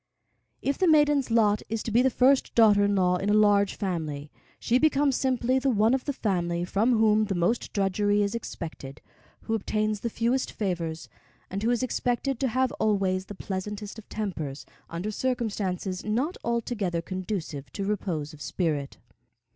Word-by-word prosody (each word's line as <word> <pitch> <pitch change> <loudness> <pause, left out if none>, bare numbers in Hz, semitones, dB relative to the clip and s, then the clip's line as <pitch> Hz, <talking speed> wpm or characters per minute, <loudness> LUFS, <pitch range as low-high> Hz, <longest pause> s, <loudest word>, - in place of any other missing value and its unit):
If 275 - -1
the 370 - +3
maiden's 295 -4 +4
lot 215 -2 +3
is 225 0 -2
to 230 - -4
be 235 +3 +4
the 265 - +4
first 260 +2 +3
daughter 210 -3 +6
in 205 0 +2
law 180 -1 +3
in 195 +3 -2
a 210 - +4
large 205 -1 +4
family, 155 -7 -4 0.3
she 245 +2 +1
becomes 285 -2 +3
simply 255 -1 +1
the 270 +1 +1
one 220 0 +3
of 265 -1 0
the 285 - 0
family 175 -8 -1
from 225 +6 +2
whom 215 -1 +4
the 195 -2 -2
most 175 +7 0
drudgery 205 +1 +1
is 200 +1 -1
expected, 160 -10 -7 0.4
who 225 - -3
obtains 215 0 -1
the 235 - -2
fewest 235 +4 0
favors, 170 -5 -3 0.4
and 195 +2 -3
who 225 - +1
is 245 +1 +1
expected 250 +1 -1
to 270 - +1
have 255 +1 +1
always 195 -3 +1
the 205 - -8
pleasantest 205 +3 -5
of 215 - -15
tempers 160 -10 -4 0.2
under 175 +6 -4
circumstances 205 -7 -2
not 250 +11 -1
altogether 215 -7 -1
conducive 175 - -5
to 195 - -3
repose 170 -7 -2
of 150 - -13
spirit. 145 -1 -2
210 Hz, 170 wpm, -27 LUFS, 185-235 Hz, 0.4 s, daughter